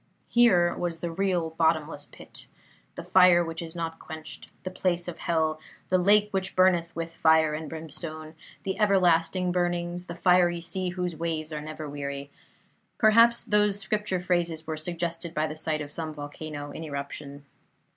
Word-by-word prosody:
Here 185 -8 +4
was 170 -2 -3
the 170 - -3
real 175 -2 0
'bottomless 160 -2 0
pit', - - -12 0.5
'the - - -6
fire 180 -2 +5
which 165 0 -5
is 165 0 -8
not 165 -1 -4
quenched', 160 -1 -9
'the 185 - -4
place 180 -2 -1
of 175 - -6
Hell', 160 -2 0 0.3
'the 185 - +4
lake 205 +3 +4
which 190 -1 -2
burneth 175 -3 +3
with 165 0 -4
fire 160 -1 +4
and 155 +1 -5
brimstone', 155 0 -7 0.3
'the 190 +1 -3
everlasting 180 -3 +3
burnings', 175 0 -1
'the 170 - -6
fiery 180 -1 +3
sea 185 +2 -2
whose 180 -1 -3
waves 160 -1 -3
are 150 - -4
never 155 0 -7
weary'. 140 0 -5 0.7
Perhaps 230 +2 +5
those 210 -1 +2
Scripture 205 -1 -1
phrases 175 -3 -1
were 160 0 -3
suggested 170 +1 -4
by 155 - +1
the 155 0 -5
sight 155 -1 -1
of 145 -1 -7
some 160 +1 -3
volcano 145 0 -7
in 160 - -7
eruption. 140 -1 -7
170 Hz, 165 wpm, -27 LUFS, 155-180 Hz, 0.7 s, fire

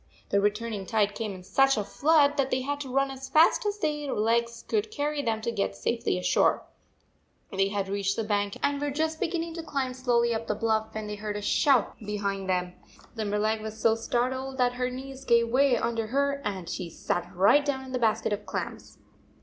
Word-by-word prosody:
The 200 - +2
returning 210 -1 -1
tide 210 -2 +1
came 220 -1 -3
in 185 -1 -9
such 270 +7 +3
a 210 - 0
flood 290 +7 +3
that 270 -1 +1
they 260 - 0
had 285 +2 -2
to 275 -2 -6
run 275 +1 +1
as 270 0 -8
fast 320 +8 +4
as 410 0 -1
their 295 -5 -2
legs 235 +2 0
could 435 0 0
carry 295 -5 -2
them 225 -4 -1
to 235 +1 -1
get 200 -3 -1
safely 235 -5 -1
ashore. 180 - +2 0.9
They 195 -1 +2
had 200 -1 -2
152 195 - -5
reached 200 0 0
the 225 - -1
bank 205 -1 -1
and 285 0 +1
were 290 - 0
just 315 +2 -1
beginning 330 -1 -2
to 330 - -5
climb 275 -5 -2
slowly 240 -2 +1
up 225 0 -3
the 210 - 0
bluff, 220 0 0
when 220 0 -3
they 210 0 -5
heard 210 0 -4
a - - -4
shout 265 +1 +2
behind 200 -2 -3
them. 180 -1 0 0.4
Limberleg 215 0 0
was 220 0 -7
so 225 0 +4
startled 260 +3 -2
that 250 -1 +2
her 250 0 -1
knees 265 +1 -8
gave 235 -2 +3
way 260 0 +4
under 230 -1 -1
her 280 +3 0
and 190 -4 -4
she 180 0 -4
sat 175 +2 -3
right 200 +11 +5
down 270 -2 -2
in 260 - -9
the 255 - -1
basket 220 -2 +1
of 205 0 -5
clams - - -5
235 Hz, 215 wpm, -27 LUFS, 210-275 Hz, 0.9 s, right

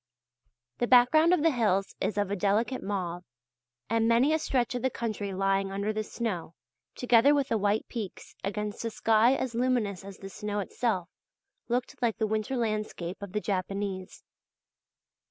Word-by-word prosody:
The 240 - +1
background 285 +7 +6
of 360 -5 +3
the 330 - +5
hills 205 -6 +1
is 210 - -1
of 205 -1 0
a - - +1
delicate 210 +6 +1
mauve, 180 -3 -3 0.6
and 225 0 +2
many 240 +6 +4
a 315 - +2
stretch 260 -4 0
of 245 - -2
the 260 - +1
country 215 -5 -3
lying 195 0 0
under 200 +2 -1
the 215 0 -2
snow, 200 -8 -4 0.4
together 250 +3 +5
with 280 -2 0
the 225 - +2
white 205 +2 +1
peaks, 220 -6 -7
against 210 +2 -3
a 230 - -1
sky 225 +3 +3
as 260 -3 -3
luminous 230 -6 0
as 195 -1 -9
the 195 - -9
snow 210 +1 -4
itself, 195 -2 -1 0.6
looked 245 +2 -2
like 235 -3 +1
the 220 - +1
winter 220 +4 -1
landscape 215 -5 -3
of 200 -2 -7
the 210 - 0
Japanese. 195 -1 -3
215 Hz, 170 wpm, -29 LUFS, 195-240 Hz, 0.6 s, background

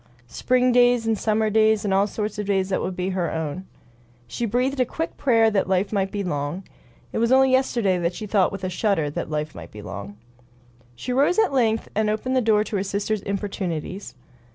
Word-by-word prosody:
Spring 250 - +1
days, 245 -1 +4
and 225 0 +2
summer 215 +1 0
days, 220 -1 +3
and 195 - +1
all 195 +1 +3
sorts 210 0 -4
of 210 - -3
days 190 -1 +1
that 190 - 0
would 185 - -3
be 180 +1 -2
her 185 -2 -1
own. 160 +3 -4 0.6
She 230 - -3
breathed 255 +5 0
a - - +5
quick 325 +7 -4
prayer 225 -4 +3
that 195 -3 0
life 190 +2 +1
might 195 -2 0
be 205 -1 -3
long. 150 +1 -3 0.5
It - - -1
was 235 +1 +2
only 265 0 +5
yesterday 205 -9 +1
she 180 - -8
had 205 - -13
thought 195 -4 +3
with 195 -1 -7
a 185 - -1
shudder 175 -6 0
that - - -4
life 150 0 -3
might - - -10
be 105 -1 -11
long. 100 +1 -8 0.8
She 245 - -5
arose 285 - +3
at 430 -9 +3
length 225 -4 +1
and 215 0 +1
opened 235 +5 -1
the 255 - +3
door 215 -2 +3
to 215 - -3
her 190 - -1
sister's 200 +1 -2
importunities. 190 - -4
205 Hz, 215 wpm, -23 LUFS, 185-230 Hz, 0.8 s, a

